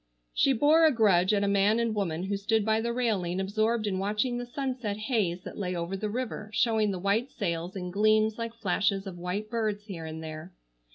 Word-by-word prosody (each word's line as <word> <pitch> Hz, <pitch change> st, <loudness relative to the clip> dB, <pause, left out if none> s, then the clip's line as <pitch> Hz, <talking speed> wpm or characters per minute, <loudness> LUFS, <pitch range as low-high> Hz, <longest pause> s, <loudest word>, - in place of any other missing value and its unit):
She 275 Hz, -, +3 dB
bore 295 Hz, +6 st, +4 dB
a -, -, +4 dB
grudge 200 Hz, -7 st, +3 dB
at 205 Hz, -1 st, +2 dB
a -, -, +1 dB
man 200 Hz, +3 st, +3 dB
and 230 Hz, -1 st, 0 dB
woman 180 Hz, -5 st, -2 dB
who 200 Hz, +1 st, -1 dB
stood 210 Hz, +2 st, 0 dB
by 220 Hz, 0 st, +2 dB
the 235 Hz, +1 st, -1 dB
railing 205 Hz, -8 st, 0 dB
absorbed 215 Hz, +3 st, 0 dB
in 190 Hz, -2 st, -1 dB
watching 215 Hz, +5 st, 0 dB
the 245 Hz, -, -5 dB
sunset 250 Hz, -5 st, -3 dB
haze 215 Hz, -6 st, -1 dB
that -, -, -8 dB
lay 180 Hz, -2 st, -2 dB
over 170 Hz, +2 st, -3 dB
the 210 Hz, +2 st, -3 dB
river 225 Hz, -2 st, -4 dB
showing 220 Hz, -3 st, +2 dB
the 190 Hz, -, -2 dB
white 200 Hz, +7 st, 0 dB
sails 170 Hz, -2 st, -3 dB
in 180 Hz, -2 st, -4 dB
gleams 215 Hz, +2 st, +3 dB
like 230 Hz, 0 st, -4 dB
flashes 200 Hz, -1 st, 0 dB
of 180 Hz, -3 st, -7 dB
white 195 Hz, +5 st, -4 dB
birds 215 Hz, -3 st, -1 dB
here 175 Hz, -6 st, -7 dB
and 160 Hz, 0 st, -7 dB
there. 160 Hz, +3 st, -8 dB
210 Hz, 215 wpm, -28 LUFS, 185-225 Hz, -, bore